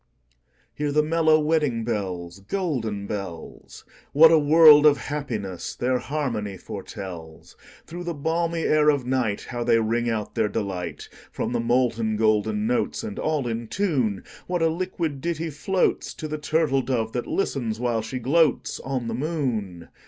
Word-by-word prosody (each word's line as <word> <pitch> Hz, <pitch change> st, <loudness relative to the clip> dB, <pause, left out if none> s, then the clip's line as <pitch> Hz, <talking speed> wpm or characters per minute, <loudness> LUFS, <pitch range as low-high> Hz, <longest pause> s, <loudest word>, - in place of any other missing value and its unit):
Hear 150 Hz, 0 st, -2 dB
the 150 Hz, +1 st, +3 dB
mellow 160 Hz, 0 st, +3 dB
wedding 150 Hz, -7 st, +1 dB
bells, 95 Hz, -5 st, -4 dB
Golden 110 Hz, -, -3 dB
bells! 100 Hz, -5 st, -7 dB, 0.3 s
What 160 Hz, +3 st, +8 dB
a 160 Hz, -, +6 dB
world 150 Hz, 0 st, +8 dB
of 145 Hz, -1 st, +5 dB
happiness 120 Hz, -, -5 dB
their 125 Hz, +1 st, 0 dB
harmony 115 Hz, -10 st, -3 dB
foretells! 85 Hz, -4 st, -9 dB, 0.3 s
Through 175 Hz, +1 st, -7 dB
the 170 Hz, -1 st, -3 dB
balmy 165 Hz, +2 st, -1 dB
air 150 Hz, 0 st, +4 dB
of 145 Hz, -3 st, +2 dB
nightHow 120 Hz, -1 st, -2 dB
they 115 Hz, -, +4 dB
ring 115 Hz, +2 st, 0 dB
out 110 Hz, -2 st, -3 dB
their 105 Hz, -, +1 dB
delight! 95 Hz, -6 st, -4 dB, 0.2 s
From -, -, -3 dB
the 120 Hz, -, 0 dB
molten 115 Hz, -2 st, +1 dB
golden 110 Hz, -, +1 dB
notes, 235 Hz, -1 st, -1 dB
And 220 Hz, -1 st, -5 dB
all 150 Hz, -5 st, -1 dB
in 115 Hz, 0 st, -3 dB
tune, 130 Hz, -, 0 dB, 0.2 s
What 175 Hz, -2 st, 0 dB
a 165 Hz, -, +4 dB
liquid 165 Hz, -4 st, -3 dB
ditty 165 Hz, 0 st, -2 dB
floatsTo 160 Hz, 0 st, -1 dB
the 155 Hz, 0 st, -4 dB
turtle 150 Hz, -3 st, +1 dB
dove 120 Hz, -3 st, -1 dB
that 120 Hz, -, -3 dB
listens, 120 Hz, -, -2 dB
while 120 Hz, -2 st, 0 dB
she 110 Hz, +4 st, -5 dB
gloatsOn 135 Hz, -2 st, 0 dB
the 115 Hz, -, -3 dB
moon! 115 Hz, -, -3 dB
130 Hz, 150 wpm, -24 LUFS, 110-155 Hz, 0.3 s, What